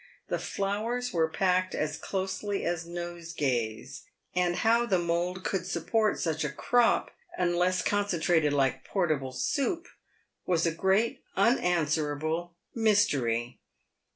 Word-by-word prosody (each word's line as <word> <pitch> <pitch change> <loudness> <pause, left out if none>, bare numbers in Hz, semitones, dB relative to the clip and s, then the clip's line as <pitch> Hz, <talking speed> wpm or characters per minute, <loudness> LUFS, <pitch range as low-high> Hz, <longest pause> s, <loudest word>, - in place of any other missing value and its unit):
The - - 0
flowers 225 +5 -2
were 165 -2 +3
packed 185 +2 +1
as 155 0 -1
closely 195 +1 -3
as 170 -1 -2
nosegays, 145 -9 -3 0.3
and 180 -1 +1
how 235 +3 +3
the 190 -5 +3
mould 175 +2 -1
could 185 -2 -2
support 210 +5 +1
such 160 -2 -1
a 150 - -1
crop— 240 - +2 0.3
unless 180 +1 +1
concentrated 175 -6 +2
like 135 -2 +1
portable 155 -9 -1
soup 305 - -1 0.3
— - - -44
was 170 -2 +2
a 165 - +2
great, 190 +7 +1
unanswerable 160 - +1 0.2
mystery. 140 - +1
175 Hz, 120 wpm, -29 LUFS, 155-200 Hz, 0.3 s, were